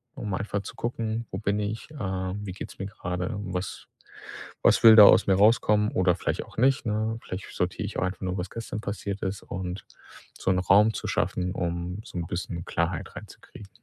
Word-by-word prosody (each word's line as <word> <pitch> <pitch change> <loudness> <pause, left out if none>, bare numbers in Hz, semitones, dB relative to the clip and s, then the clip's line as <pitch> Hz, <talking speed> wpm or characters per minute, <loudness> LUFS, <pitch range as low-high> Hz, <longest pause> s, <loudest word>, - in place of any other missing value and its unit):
um 105 -3 -4
einfach 100 +1 -2
zu - - -9
gucken: 115 -1 -3
„Wo 95 - -3
bin 100 -1 0
ich?“, 105 +5 -4
äh: - - -12
„Wie 95 -1 -3
geht's 95 - -9
mir 95 - -3
grade? 90 -1 -4
Was 95 -2 -5 0.8
was - - +4
will 110 -1 +10
da 105 - +12
aus - - +7
mir 95 - +4
rauskommen? 105 +1 +4
Oder 90 -2 +3
vielleicht - - -2
auch - - -18
nicht, 130 +3 +3
ne?“ 110 +1 -1
Vielleicht 95 0 -6
sortiere - - -1
ich - - -5
auch - - 0
einfach 95 +1 -2
nur, 95 -1 -2
was 90 +1 -4
gestern 115 -2 -5
passiert 100 -1 -4
ist 95 +1 -3
und 95 0 -5 0.5
so - - 0
'n 90 - +2
Raum 105 +4 +5
zu - - -5
schaffen, 90 0 -1
um 85 +1 -3
so 115 - -9
'n 85 - -4
bisschen 85 -1 -4
Klarheit 85 0 -2
reinzukriegen. 100 - -12
100 Hz, 200 wpm, -26 LUFS, 90-105 Hz, 0.8 s, da